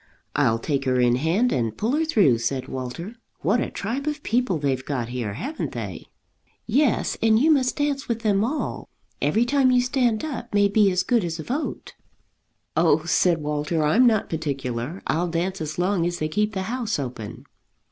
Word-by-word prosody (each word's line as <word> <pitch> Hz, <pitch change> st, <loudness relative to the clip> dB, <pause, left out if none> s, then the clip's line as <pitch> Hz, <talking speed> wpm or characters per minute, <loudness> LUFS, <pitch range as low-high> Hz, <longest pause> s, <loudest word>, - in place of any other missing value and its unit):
"I'll 115 Hz, -, +3 dB
take 135 Hz, +3 st, -2 dB
her 130 Hz, -1 st, +2 dB
in 120 Hz, 0 st, +3 dB
hand 175 Hz, -, +1 dB
and 115 Hz, -3 st, -1 dB
pull 220 Hz, +3 st, 0 dB
her 310 Hz, +3 st, +1 dB
through," 190 Hz, -, +3 dB
said 130 Hz, +3 st, -2 dB
Walter. 130 Hz, -, -6 dB, 0.2 s
"What 200 Hz, +10 st, +2 dB
a -, -, -2 dB
tribe 250 Hz, +8 st, -4 dB
of 300 Hz, -1 st, -3 dB
people 235 Hz, -6 st, +1 dB
they've 135 Hz, -3 st, -1 dB
got 125 Hz, -5 st, -3 dB
here, 120 Hz, -5 st, -3 dB
haven't 290 Hz, -, -4 dB
they?" -, -, -6 dB, 0.6 s
"Yes, 255 Hz, +2 st, +1 dB
and 220 Hz, -1 st, +4 dB
you 300 Hz, +7 st, +4 dB
must 260 Hz, -4 st, +2 dB
dance 290 Hz, -2 st, -1 dB
with 230 Hz, -1 st, -2 dB
them 205 Hz, -2 st, +2 dB
all. 275 Hz, +7 st, -3 dB, 0.3 s
Every 230 Hz, +3 st, +2 dB
time 270 Hz, 0 st, +3 dB
you 250 Hz, -1 st, +4 dB
stand 245 Hz, -1 st, +1 dB
up 240 Hz, -7 st, -5 dB
may 205 Hz, 0 st, +5 dB
be 205 Hz, 0 st, +4 dB
as 185 Hz, 0 st, +1 dB
good 235 Hz, -1 st, +2 dB
as 165 Hz, -1 st, -3 dB
a 160 Hz, -, -6 dB
vote." 280 Hz, -, -4 dB, 0.8 s
"Oh," 160 Hz, -2 st, +3 dB
said 170 Hz, -1 st, +2 dB
Walter, 150 Hz, +2 st, -1 dB
"I'm 225 Hz, +12 st, +5 dB
not 220 Hz, -3 st, +2 dB
particular; 140 Hz, -1 st, -4 dB
I'll 170 Hz, +3 st, 0 dB
dance 175 Hz, +2 st, -2 dB
as 155 Hz, 0 st, -4 dB
long 180 Hz, -1 st, +1 dB
as 175 Hz, 0 st, -3 dB
they 155 Hz, -, -1 dB
keep 210 Hz, +6 st, 0 dB
the 190 Hz, -, -1 dB
house 230 Hz, +1 st, -2 dB
open." 125 Hz, -6 st, -6 dB
190 Hz, 190 wpm, -24 LUFS, 145-240 Hz, 0.8 s, may